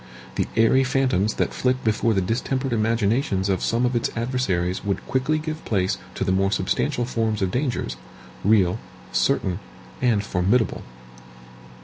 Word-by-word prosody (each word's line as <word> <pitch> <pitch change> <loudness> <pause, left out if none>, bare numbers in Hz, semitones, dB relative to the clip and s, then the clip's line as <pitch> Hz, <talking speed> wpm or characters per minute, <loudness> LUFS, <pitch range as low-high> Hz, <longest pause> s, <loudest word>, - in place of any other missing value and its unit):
The - - -1
airy 115 +4 +5
phantoms 130 -6 +1
that - - 0
flit 130 0 0
before 110 0 +2
the 95 - +2
distempered 130 +6 -1
imaginations 110 -2 +1
of 95 -2 +1
some 120 +2 +1
of 125 0 0
its 120 - +1
adversaries 105 -8 -1
would 100 -1 -2
quickly 135 +4 +1
give 155 +1 -5
place 95 -3 0 0.2
to - - -1
the 95 - 0
more 95 +1 +2
substantial 120 +7 0
forms 110 -4 -1
of 95 - 0
dangers, 120 - -2 0.5
real, 95 -4 +3 0.3
certain, 90 -2 +1 0.4
and 115 -5 +2
formidable. 100 +5 +1
115 Hz, 145 wpm, -23 LUFS, 95-125 Hz, 0.5 s, airy